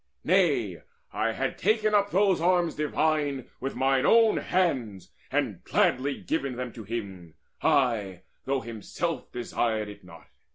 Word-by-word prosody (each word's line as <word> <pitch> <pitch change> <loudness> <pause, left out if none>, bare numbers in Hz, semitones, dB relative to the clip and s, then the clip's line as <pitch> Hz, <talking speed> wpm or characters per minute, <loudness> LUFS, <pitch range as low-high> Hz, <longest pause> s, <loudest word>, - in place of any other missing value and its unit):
Nay, - - +2 0.3
I - - 0
had - - -3
taken 215 -1 +2
up 205 -1 +3
those 195 -2 +2
arms 175 -1 +2
divine 150 -3 0
With 135 - -4
mine 135 0 +2
own 225 +4 +5
hands, 130 - -1 0.2
and - - -1
gladly 135 +2 +1
given 140 -5 -2
them 125 -1 -5
To 115 - -9
him, 95 -7 -6 0.3
ay, 105 -9 +1 0.2
though 135 0 0
himself 120 - -4
desired 115 -3 -1
it 100 -1 -12
not. 85 -2 -14
135 Hz, 135 wpm, -27 LUFS, 110-170 Hz, 0.3 s, own